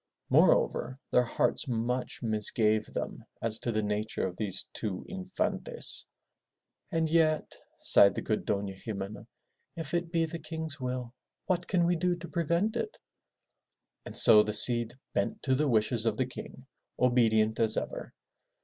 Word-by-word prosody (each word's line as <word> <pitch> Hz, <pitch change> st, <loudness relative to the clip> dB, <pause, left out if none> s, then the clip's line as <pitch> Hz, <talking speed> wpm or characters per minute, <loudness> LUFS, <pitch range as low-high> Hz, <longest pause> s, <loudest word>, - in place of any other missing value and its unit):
Moreover, 130 Hz, -, +3 dB
their 125 Hz, -, +5 dB
hearts 120 Hz, -, 0 dB
much 125 Hz, +2 st, -2 dB
misgave 110 Hz, 0 st, +1 dB
them -, -, -5 dB, 0.2 s
as 115 Hz, -1 st, -1 dB
to 120 Hz, -, -2 dB
the 110 Hz, -1 st, -1 dB
nature 105 Hz, +1 st, -2 dB
of 90 Hz, -1 st, -4 dB
these 100 Hz, -3 st, -1 dB
two 100 Hz, -5 st, -4 dB
Infantes. 195 Hz, -, -3 dB, 0.8 s
And 165 Hz, -2 st, +1 dB
yet," 155 Hz, -1 st, +1 dB, 0.3 s
sighed 100 Hz, -2 st, +6 dB
the -, -, -3 dB
good -, -, -1 dB
Dofia 100 Hz, -1 st, -3 dB
Ximena, 100 Hz, -2 st, -6 dB, 0.5 s
'*if 165 Hz, -3 st, -6 dB
it 175 Hz, -1 st, -1 dB
be 165 Hz, -1 st, +2 dB
the 165 Hz, +1 st, -6 dB
King's 160 Hz, -1 st, -5 dB
will, 125 Hz, -1 st, -4 dB, 0.3 s
what 175 Hz, -1 st, -1 dB
can 175 Hz, -3 st, +2 dB
we 175 Hz, +1 st, +2 dB
do 175 Hz, +1 st, 0 dB
to 175 Hz, 0 st, -9 dB
prevent 170 Hz, +5 st, 0 dB
it?'* 430 Hz, -, -3 dB, 1.1 s
And -, -, -5 dB
so 105 Hz, -, +8 dB
the 105 Hz, 0 st, -2 dB
Cid 120 Hz, +2 st, +5 dB, 0.2 s
bent 215 Hz, -, -2 dB
to 130 Hz, -, +1 dB
the 145 Hz, +3 st, +1 dB
wishes 115 Hz, -1 st, +2 dB
of 110 Hz, -1 st, 0 dB
the 130 Hz, -, +1 dB
King, 130 Hz, +1 st, -10 dB, 0.3 s
obedient 115 Hz, -3 st, +3 dB
as 115 Hz, -1 st, +2 dB
ever. -, -, -4 dB
125 Hz, 155 wpm, -29 LUFS, 110-165 Hz, 1.1 s, so